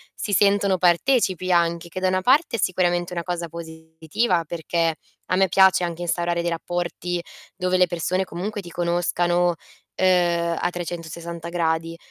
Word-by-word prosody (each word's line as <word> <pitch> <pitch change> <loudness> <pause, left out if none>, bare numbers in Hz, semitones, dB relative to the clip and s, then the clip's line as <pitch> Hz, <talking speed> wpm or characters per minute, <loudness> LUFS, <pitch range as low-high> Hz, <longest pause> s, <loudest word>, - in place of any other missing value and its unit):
si 210 - -4
sentono 200 0 +3
partecipi 185 0 +2
anche, 170 0 +1
che 185 - -5
da 185 - +1
una 185 0 +1
parte 265 - +3
è - - -3
sicuramente 175 -1 +1
una 170 -1 -3
cosa 175 -1 -4
positiva, 160 +3 -2
perché 165 0 -1 0.3
a - - +1
me 190 +1 +4
piace 190 0 +5
anche 170 -1 -3
instaurare 175 0 -1
dei 170 - -1
rapporti 175 +1 -3 0.3
dove 185 0 0
le 180 0 +4
persone 175 +2 -1
comunque 200 +4 -5
ti 175 - -11
conoscano, 175 0 +1 0.4
ehm, 170 -2 +2
a - - 0
360 170 -1 -6
gradi. 165 -1 -1
175 Hz, 155 wpm, -23 LUFS, 170-185 Hz, 0.4 s, piace